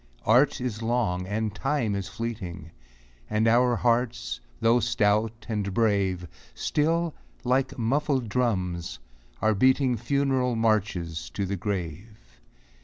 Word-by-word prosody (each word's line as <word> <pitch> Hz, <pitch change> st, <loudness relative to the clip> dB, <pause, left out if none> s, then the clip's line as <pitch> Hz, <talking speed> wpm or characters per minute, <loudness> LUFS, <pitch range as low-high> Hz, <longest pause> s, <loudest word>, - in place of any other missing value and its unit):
Art 125 Hz, +6 st, +4 dB
is 120 Hz, -3 st, -3 dB
long, 110 Hz, -6 st, 0 dB
and 105 Hz, +1 st, -2 dB
Time 130 Hz, -1 st, 0 dB
is 100 Hz, -1 st, -3 dB
fleeting, 95 Hz, -8 st, -6 dB, 0.6 s
And 110 Hz, +1 st, +2 dB
our 120 Hz, +1 st, +4 dB
hearts, 115 Hz, -, 0 dB, 0.2 s
though 115 Hz, +2 st, +4 dB
stout 110 Hz, -1 st, +1 dB
and 105 Hz, -4 st, -2 dB
brave, 100 Hz, -5 st, +1 dB, 0.3 s
Still, 165 Hz, +2 st, 0 dB, 0.3 s
like 130 Hz, +2 st, +1 dB
muffled 130 Hz, +1 st, 0 dB
drums, 95 Hz, -, -1 dB, 0.5 s
are 110 Hz, 0 st, +4 dB
beating 130 Hz, +3 st, +3 dB
Funeral 135 Hz, -1 st, +1 dB
marches 95 Hz, -, 0 dB
to 100 Hz, -, -1 dB
the 100 Hz, +1 st, -2 dB
grave. 95 Hz, -, -5 dB
110 Hz, 115 wpm, -26 LUFS, 100-125 Hz, 0.6 s, Art